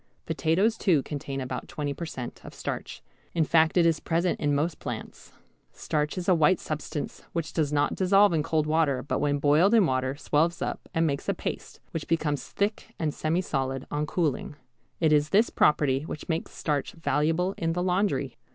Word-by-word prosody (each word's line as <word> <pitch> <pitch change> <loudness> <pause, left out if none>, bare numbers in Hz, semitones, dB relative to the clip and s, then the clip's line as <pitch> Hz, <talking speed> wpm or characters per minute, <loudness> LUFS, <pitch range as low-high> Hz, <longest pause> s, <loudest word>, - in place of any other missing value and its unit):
Potatoes 195 +8 +1
too 160 -9 +3
contain 140 -2 -5
about 130 -1 -4
20 145 -2 -3
per 170 +3 -6
cent. 125 -6 -7
of - - -11
starch, - - -5 0.3
in 165 - +3
fact 160 +2 +3
it 170 - +5
is 165 -2 +3
present 170 +2 0
in 145 -1 +1
most 155 +4 -1
plants. - - -7 0.4
Starch 150 +2 -2
is 180 - -4
a 185 - +6
white 165 +2 +4
substance 155 -1 -5
which 165 -3 -3
does 150 -3 0
not 145 -1 +2
dissolve 195 0 +4
in 160 - +2
cold 155 +1 0
water, 155 -4 +1
but 145 - -1
when 145 -1 +1
boiled 150 +9 +4
in 215 -4 +6
water 130 -1 0
swells 155 +3 +1
up - - -4
and 165 0 +1
makes, 140 -3 -2
a - - +1
paste, - - -6
which 160 - -4
becomes 155 -4 0
thick 210 +2 -2
and 155 -2 -1
semisolid 135 -6 -1
on 150 +1 -1
cooling. 150 -4 -1 0.4
It 160 -2 +3
is 150 0 +3
this 210 +6 +3
property 140 -3 +3
which 150 - -7
makes 165 -1 -2
starch 145 -3 -2
valuable 165 +3 0
in 165 0 0
the 180 +1 -1
laundry. 180 - 0
155 Hz, 190 wpm, -27 LUFS, 145-170 Hz, 0.4 s, a